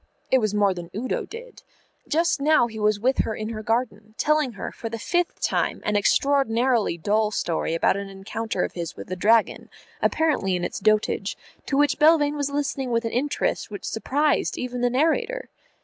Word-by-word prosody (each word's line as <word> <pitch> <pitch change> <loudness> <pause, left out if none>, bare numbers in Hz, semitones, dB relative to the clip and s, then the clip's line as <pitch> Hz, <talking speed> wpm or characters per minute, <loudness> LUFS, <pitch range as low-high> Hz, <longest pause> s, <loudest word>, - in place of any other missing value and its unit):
It 260 - +5
was 215 -3 -1
more 200 -2 +3
than 175 -2 -8
Udo 255 +4 -2
did. 480 +2 -10 0.5
Just 330 -2 +1
now 305 -3 +4
he 220 -2 -7
was 210 -1 +2
with 260 +5 +1
her 220 - 0
in 215 0 -4
her 220 -1 -5
garden, 220 -2 -2
telling 305 -4 +1
her 205 - -6
for 225 - -6
the 230 - -4
fifth 350 +9 -1
time - - 0
an 210 - 0
extraordinarily 240 -2 +2
dull 210 +5 +1
story 165 -5 -1
about 165 - +2
an 200 0 -5
encounter 195 +1 -3
of - - -2
his 170 -2 -5
with - - -10
a - - -1
dragon, 220 +4 +2 0.3
apparently 300 - +1
in 175 - -2
its - - -3
dotage, 215 +1 +1 0.3
to 275 - 0
which 290 -1 +2
Belvane 300 -1 +5
was 285 -1 -1
listening 280 -2 -2
with 230 -1 0
an 225 - -2
interest 285 +4 -1
which 205 -1 -7
surprised 285 +6 0
even 250 -1 -4
the 245 - +3
narrator. 330 - 0
230 Hz, 190 wpm, -24 LUFS, 210-285 Hz, 0.5 s, It